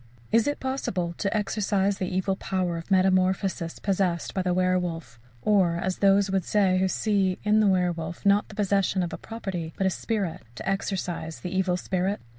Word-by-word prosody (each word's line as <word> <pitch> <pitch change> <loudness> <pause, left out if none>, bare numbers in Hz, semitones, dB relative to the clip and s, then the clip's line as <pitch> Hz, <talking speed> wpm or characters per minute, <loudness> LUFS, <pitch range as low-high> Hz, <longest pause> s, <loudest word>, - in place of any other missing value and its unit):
Is 230 +2 +4
it 290 - -1
possible 190 -10 -2
to 200 - 0
exorcize 200 -2 0
the 185 - -1
evil 190 +1 0
power 185 -3 -2
of 165 +3 -7
metamorphosis 185 -2 +2
possessed 185 -4 -1
by 190 - 0
the 180 -1 0
werwolf, 175 -9 -1 0.2
or, 190 -5 +3
as 185 +1 -2
those 200 0 +4
would 190 -1 +1
say 190 -1 +2
who 190 - +2
see 195 -2 +1
in 210 +1 +3
the 215 - +4
werwolf, 175 -2 0
not 200 +1 +4
the 215 - -11
possession 195 -2 +1
of 170 - -4
a - - -4
property, 185 -8 -5
but 195 - 0
a 190 - +3
spirit, 200 -4 -2
"to - - -7
exorcize 185 -4 -3
the 180 0 -4
evil 185 -1 +1
spirit"? 190 +2 -1
190 Hz, 185 wpm, -26 LUFS, 180-200 Hz, 0.2 s, Is